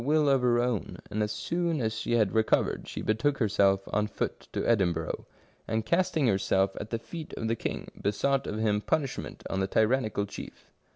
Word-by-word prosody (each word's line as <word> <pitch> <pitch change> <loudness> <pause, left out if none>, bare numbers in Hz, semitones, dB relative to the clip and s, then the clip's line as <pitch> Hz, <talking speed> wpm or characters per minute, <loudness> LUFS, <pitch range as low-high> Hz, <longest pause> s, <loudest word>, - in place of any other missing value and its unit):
will 150 +2 +3
of 135 -2 +4
her 120 -1 +3
own, 120 -7 -1
and 105 +1 -1
as 105 0 0
soon 170 +8 -1
as 110 -3 0
she 110 +1 -2
had 110 -5 +3
recovered, 110 -1 +2
she - - -5
betook 120 +6 +1
herself 100 -4 +3
on 105 +1 +2
foot - - -4
to - - -2
Edinburgh, 85 -8 +1 0.4
and 110 0 -1
casting 170 -4 +2
herself 95 -2 +2
at 105 - -7
the 115 - -1
feet 155 +8 -8
of 115 - -2
the 115 - +1
king, - - -4
besought 135 +7 +1
of 105 - -3
him 105 -1 +1
punishment 140 +3 -2
on 95 - -2
the 95 - +1
tyrannical 110 -1 +2
chief. 100 - -10
110 Hz, 190 wpm, -29 LUFS, 105-135 Hz, 0.4 s, of